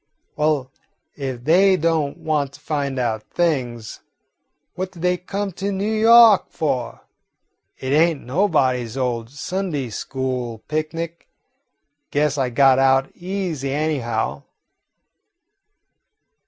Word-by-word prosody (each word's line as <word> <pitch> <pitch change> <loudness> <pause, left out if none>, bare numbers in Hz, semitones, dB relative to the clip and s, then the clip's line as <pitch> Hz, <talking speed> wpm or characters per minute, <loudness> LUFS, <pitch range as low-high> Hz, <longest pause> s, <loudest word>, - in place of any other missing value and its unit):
Well, 150 -4 0 0.4
if 130 -4 -5
they 185 +6 +5
don't 160 -3 0
want 145 -3 -1
to 145 - -14
find 145 -2 -2
out 115 -4 -1
things, 125 -10 -2 0.7
what 185 0 -4
do 175 - -13
they 180 +1 +2
come 195 +3 -4
to 195 +3 -5
N' 195 -1 -2
Yawk 220 0 +6
for? 130 -6 -2 0.8
It 130 +1 -3
ain't 160 -1 +3
nobody's 130 - +1
old 120 -3 -2
Sunday 145 -2 -3
school 125 -1 -4
picnic. 165 +2 -4 0.8
Guess 145 0 0
I 130 -2 +1
got 130 +1 +4
out 135 0 +2
easy, 175 -7 -3
anyhow." 120 - -1
145 Hz, 110 wpm, -21 LUFS, 130-175 Hz, 0.8 s, Yawk